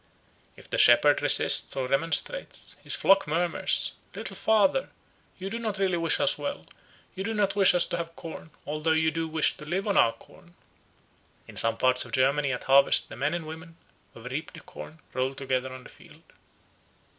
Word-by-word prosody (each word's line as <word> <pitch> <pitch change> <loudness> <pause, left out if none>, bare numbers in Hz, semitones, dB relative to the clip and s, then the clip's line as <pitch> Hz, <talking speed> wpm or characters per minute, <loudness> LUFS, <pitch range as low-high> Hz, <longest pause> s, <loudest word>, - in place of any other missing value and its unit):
If - - -13
the - - -3
shepherd - - +5
resists - - +4
or 130 -2 -2
remonstrates, 165 - -2
his - - -2
flock 195 -3 +3
murmurs, 170 +2 0 0.2
"Little - - -6
Father, 220 +4 +1 0.5
you 190 - -6
do 230 - -4
not 215 -3 -3
really 190 -3 0
wish 165 -2 0
us - - +1
well, - - -5 0.5
you 190 - -5
do 225 +2 -3
not 200 -2 0
wish 195 -3 +5
us 175 - +4
to 175 - -4
have 165 0 -6
corn, 160 -1 -10 0.2
although 155 +2 -1
you 160 0 +1
do 165 0 -3
wish 160 0 0
to - - -11
live 185 +7 -3
on 200 - 0
our 115 - +4
corn." 175 0 -20 0.9
In - - -13
some 115 0 +3
parts 130 0 +2
of - - -13
Germany 140 +2 +1
at 125 - -4
harvest 135 +1 +4
the - - -9
men 145 +7 -1
and 170 -2 -5
women, 160 +1 -10 0.4
who 115 - -13
have 125 - -8
reaped 155 +6 -6
the 160 - -11
corn, 155 - -12 0.2
roll 130 +1 -2
together 130 -1 -3
on 130 0 -10
the - - -13
field. - - -18
160 Hz, 195 wpm, -26 LUFS, 135-185 Hz, 0.9 s, shepherd